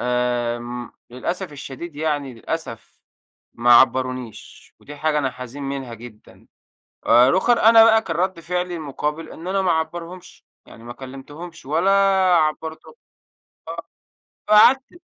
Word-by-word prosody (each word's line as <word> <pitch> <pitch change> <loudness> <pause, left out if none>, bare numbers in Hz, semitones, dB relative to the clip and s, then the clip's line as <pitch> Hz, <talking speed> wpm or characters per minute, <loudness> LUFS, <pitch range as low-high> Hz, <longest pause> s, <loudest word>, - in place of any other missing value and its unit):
آمم 120 -1 -2 0.2
للأسف 175 +8 -4
الشديد 145 +3 -9
يعني 145 -4 -2
للأسف 115 -2 -7 0.5
ما 120 +1 +4
عبّرونيش 130 -1 +1
ودي 145 - -11
حاجة 150 0 0
أنا 130 -3 -1
حزين 125 +3 -9
منها 135 -3 -5
جدًا. 115 -1 -14 0.6
آآ 120 +2 +6
رُوخَر 210 - +3
أنا 225 0 +7
بقى 225 0 +5
كان 165 - -5
رَد 185 +1 -1
فعلي 180 +1 -3
المُقابل 150 +1 -4
إن 165 - -10
أنا 195 +1 0
ما 185 -2 +2
أعبّرهمش، 170 +2 -5 0.2
يعني 115 - -15
ما 120 +1 -8
كلِّمتهمش 145 +7 -11
ولا 165 +7 +1 0.5
عبّرتهم، 160 0 -2 1.6
آه. - - +4
فقعدت 265 +10 +5
150 Hz, 125 wpm, -21 LUFS, 125-175 Hz, 1.6 s, أنا